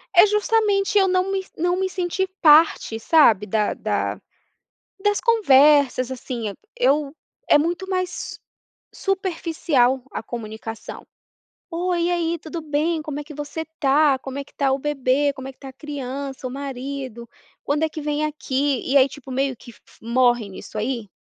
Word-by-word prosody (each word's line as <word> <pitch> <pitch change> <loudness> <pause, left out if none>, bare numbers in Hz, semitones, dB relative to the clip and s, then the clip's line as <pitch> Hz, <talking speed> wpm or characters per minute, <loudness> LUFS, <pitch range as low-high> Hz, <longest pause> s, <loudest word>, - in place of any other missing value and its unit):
É 355 - +9
justamente 420 -1 +2
eu 385 -1 +5
não 370 +1 +1
me 385 -1 -2
não 355 +2 0
me 380 0 0
sentir 370 +1 -1
parte, 305 -7 +5
sabe, 225 - +4
da 210 +1 0
da - - -2 0.8
das 415 0 +2
conversas, 285 - +4
assim. 240 -4 -4 0.2
Eu 280 +2 +1 0.3
é - - +7
muito 345 +5 -2
mais 370 -1 -3 0.6
superficial 330 - 0
a - - -4
comunicação. 225 -1 -7 0.7
"Oi, 345 0 0
e 345 - +1
aí, 340 -1 0
tudo 325 +2 -6
bem? 310 +2 0
Como 300 -1 -5
é 295 - -5
que 300 - -11
você 295 +2 -5
tá? 280 -1 +4
Como 265 +1 -7
é - - -4
que - - -24
tá 275 -2 +1
o 270 - 0
bebê? 285 0 +1
Como 265 -1 -8
é 270 - -6
que - - -40
tá 270 - -9
a 260 - -12
criança? 275 -2 -6
O 250 - -7
marido? 265 -3 -6 0.4
Quando 295 +2 0
é 320 - +1
que 310 0 -7
vem 295 +1 -1
aqui?". 280 -3 -1
E 280 - +6
aí, 265 0 +6
tipo, 270 -2 -11
meio 270 0 0
que 240 +1 -13 0.3
morre 240 -1 +2
nisso 195 - -9
aí. 225 -2 -3
290 Hz, 165 wpm, -22 LUFS, 260-340 Hz, 0.8 s, É